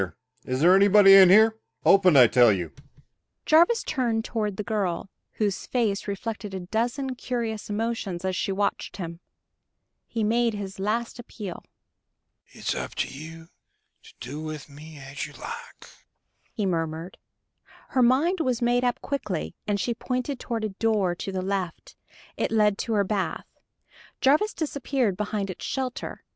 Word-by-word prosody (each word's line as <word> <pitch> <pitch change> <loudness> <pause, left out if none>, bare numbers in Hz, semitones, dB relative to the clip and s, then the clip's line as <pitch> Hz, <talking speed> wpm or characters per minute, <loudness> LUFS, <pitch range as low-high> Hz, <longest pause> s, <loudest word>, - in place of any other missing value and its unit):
Open, 185 -6 +6
I 125 - +9
tell 120 -1 +5
you." 90 -5 -2 0.7
Jarvis 345 +9 +4
turned 235 -6 -1
toward 210 -4 -2
the 210 - -2
girl, 195 -4 -2 0.2
whose 205 -3 -2
face 215 -6 0
reflected 205 0 -5
a 190 - -4
dozen 240 +8 -2
curious 235 -4 -4
emotions 205 -4 -3
as 185 0 -1
she 195 - -1
watched 200 +1 -2
him. 170 -3 -6 0.9
He 225 -2 -2
made 230 +1 +2
his 195 -1 -6
last 230 +4 -2
appeal. 210 -6 -8 0.8
"It's - - -4
up - - -5
to - - -1
you 160 +4 -10 0.5
to - - -17
do 140 +6 -6
with 155 -2 -7
me 155 +2 -12
as 140 0 -6
you - - -14
like," 475 +1 -9 0.6
he 210 - -2
murmured. 165 -1 -3 0.7
Her 260 - +1
mind 285 +10 +3
was 255 -6 0
made 245 +1 +2
up 245 -1 0
quickly, 80 - -3
and 205 -1 0
she 235 +5 0
pointed 250 +3 -3
toward 230 -2 -3
a 215 - -1
door 205 -2 +1
to 185 +3 -5
the 185 -1 -3
left 190 -3 -4 0.4
it - - 0
led 210 -2 +3
to 230 - -2
her 205 -2 +3
bath. 190 -4 -2 0.7
Jarvis 305 +11 +3
disappeared 275 - -1
behind 205 0 -2
its - - -10
shelter. 260 -2 -4
210 Hz, 145 wpm, -26 LUFS, 180-240 Hz, 0.9 s, I